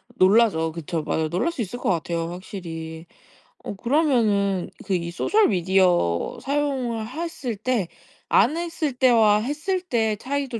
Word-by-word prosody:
놀라죠. 185 Hz, -5 st, +4 dB
그쵸. 165 Hz, 0 st, -4 dB
맞아요. 155 Hz, +1 st, -1 dB
놀랄 185 Hz, -, 0 dB
수 275 Hz, -, -5 dB
있을 225 Hz, +3 st, -4 dB
것 -, -, -1 dB
같아요 170 Hz, -1 st, -2 dB
확실히. 165 Hz, -4 st, -7 dB, 0.6 s
어 -, -, -5 dB
그러면은 220 Hz, -, +1 dB, 0.2 s
그 195 Hz, -, -1 dB
이 170 Hz, -1 st, -2 dB
소셜 420 Hz, -, +2 dB
미디어 180 Hz, -, +2 dB
사용을 265 Hz, -6 st, -1 dB
했을 285 Hz, -4 st, -4 dB
때 215 Hz, -3 st, -1 dB, 0.4 s
안 260 Hz, +11 st, +4 dB
했을 330 Hz, -5 st, -2 dB
때와 230 Hz, -5 st, +4 dB
했을 305 Hz, -, -2 dB
때 225 Hz, -11 st, 0 dB
차이도 265 Hz, 0 st, -3 dB
215 Hz, 280 characters per minute, -23 LUFS, 175-270 Hz, 0.6 s, 놀라죠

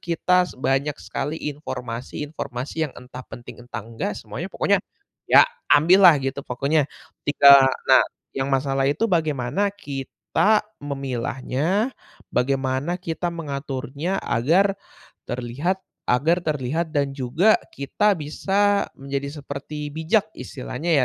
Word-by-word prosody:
kita 180 Hz, +1 st, +2 dB
banyak 135 Hz, +2 st, 0 dB
sekali 145 Hz, +3 st, -4 dB, 0.2 s
informasi-informasi 130 Hz, +2 st, -5 dB
yang -, -, -16 dB
entah 125 Hz, 0 st, -10 dB
penting, 120 Hz, 0 st, -10 dB
entah 105 Hz, -4 st, -6 dB
enggak, 115 Hz, -3 st, -4 dB
semuanya 110 Hz, -, -6 dB
pokoknya 200 Hz, 0 st, +1 dB, 0.5 s
ya -, -, +8 dB, 0.2 s
ambil 180 Hz, +6 st, +7 dB
lah 160 Hz, -, +7 dB
gitu 135 Hz, +1 st, -2 dB
pokoknya, 140 Hz, +3 st, 0 dB, 0.3 s
ketika 140 Hz, -1 st, +7 dB, 0.2 s
nah, -, -, +7 dB, 0.3 s
yang 135 Hz, 0 st, -2 dB
masalah 135 Hz, 0 st, +1 dB
itu 150 Hz, +10 st, 0 dB
bagaimana 155 Hz, +3 st, +1 dB
kita 200 Hz, +4 st, 0 dB, 0.2 s
memilahnya, 140 Hz, -, -2 dB, 0.4 s
bagaimana 130 Hz, +4 st, 0 dB
kita 175 Hz, 0 st, -3 dB
mengaturnya 145 Hz, +2 st, -4 dB
agar 180 Hz, -, +2 dB, 0.5 s
terlihat 125 Hz, +10 st, -2 dB, 0.3 s
agar 150 Hz, +8 st, +3 dB
terlihat 155 Hz, +2 st, -1 dB
dan 140 Hz, -1 st, +1 dB
juga 145 Hz, -, +3 dB, 0.2 s
kita 205 Hz, +9 st, +1 dB
bisa 200 Hz, +7 st, +1 dB
menjadi 140 Hz, +2 st, -4 dB
seperti 145 Hz, +2 st, -6 dB
bijak 165 Hz, +8 st, +1 dB
istilahnya 140 Hz, +4 st, -5 dB
145 Hz, 110 wpm, -23 LUFS, 130-170 Hz, 0.5 s, ya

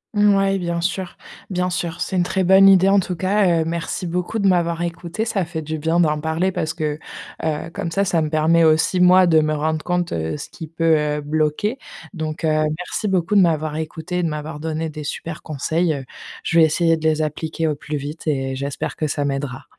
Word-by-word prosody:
Mouais 195 Hz, -1 st, +3 dB
bien 170 Hz, -1 st, -2 dB
sûr, 180 Hz, +1 st, -3 dB, 0.3 s
bien 180 Hz, -1 st, -1 dB
sûr, 170 Hz, -2 st, -3 dB
c'est 190 Hz, -, -2 dB
une 180 Hz, -, +3 dB
très 190 Hz, +2 st, 0 dB
bonne 190 Hz, +2 st, +7 dB
idée. 190 Hz, -1 st, +6 dB
En 200 Hz, +1 st, +5 dB
tout 180 Hz, -1 st, -3 dB
cas, 185 Hz, -1 st, +2 dB
heu, -, -, -1 dB
merci 170 Hz, +2 st, -3 dB
beaucoup 180 Hz, +5 st, -2 dB
de 200 Hz, -2 st, +2 dB
m'avoir 170 Hz, -2 st, +1 dB
écoutée, 170 Hz, +5 st, -4 dB
ça 205 Hz, -4 st, 0 dB
fait 165 Hz, -2 st, -5 dB
du 155 Hz, +1 st, -4 dB
bien 160 Hz, +3 st, +1 dB
d'en 155 Hz, -3 st, +2 dB
parler 160 Hz, +4 st, 0 dB
parce 160 Hz, -3 st, -3 dB
que, 150 Hz, -1 st, -2 dB, 0.4 s
heu, 160 Hz, +1 st, -2 dB
comme -, -, -3 dB
ça, 195 Hz, +4 st, 0 dB
ça 170 Hz, -3 st, +1 dB
me 155 Hz, -, -1 dB
permet 160 Hz, +2 st, +3 dB
aussi 160 Hz, +3 st, +3 dB
moi 180 Hz, +1 st, +6 dB
de 160 Hz, -2 st, +5 dB
me 155 Hz, 0 st, +1 dB
rendre 155 Hz, +1 st, -1 dB
compte, 175 Hz, -1 st, -1 dB
heu, 80 Hz, -1 st, -2 dB
ce -, -, -8 dB
qui 160 Hz, -, -9 dB
peut, 165 Hz, 0 st, +2 dB
heu, 150 Hz, 0 st, -1 dB
bloquer. 155 Hz, -, -1 dB, 0.3 s
Donc, 155 Hz, -3 st, -5 dB
heu, -, -, +2 dB, 0.3 s
merci 180 Hz, +5 st, -3 dB
beaucoup 185 Hz, -1 st, 0 dB
de 200 Hz, -, +7 dB
m'avoir 155 Hz, -3 st, +1 dB
écoutée 160 Hz, +2 st, -4 dB
et -, -, 0 dB
de -, -, +1 dB
m'avoir 150 Hz, 0 st, -5 dB
donné 160 Hz, +1 st, -3 dB
des 150 Hz, 0 st, -7 dB
super 160 Hz, +3 st, -5 dB
conseils, 155 Hz, +2 st, -1 dB
heu, 135 Hz, -1 st, -7 dB, 0.4 s
je 165 Hz, -, +2 dB
vais 160 Hz, -, +8 dB
essayer 165 Hz, +1 st, +2 dB
de 160 Hz, -, -8 dB
les 155 Hz, 0 st, +2 dB
appliquer 160 Hz, +1 st, -2 dB
au 155 Hz, -, +1 dB
plus 150 Hz, +1 st, -5 dB
vite 145 Hz, +4 st, -7 dB
et 135 Hz, -3 st, -1 dB
j'espère 140 Hz, +1 st, -4 dB
que 155 Hz, -, -1 dB
ça 145 Hz, 0 st, -1 dB
m'aidera. 135 Hz, -2 st, -3 dB
165 Hz, 225 wpm, -21 LUFS, 155-180 Hz, 0.4 s, vais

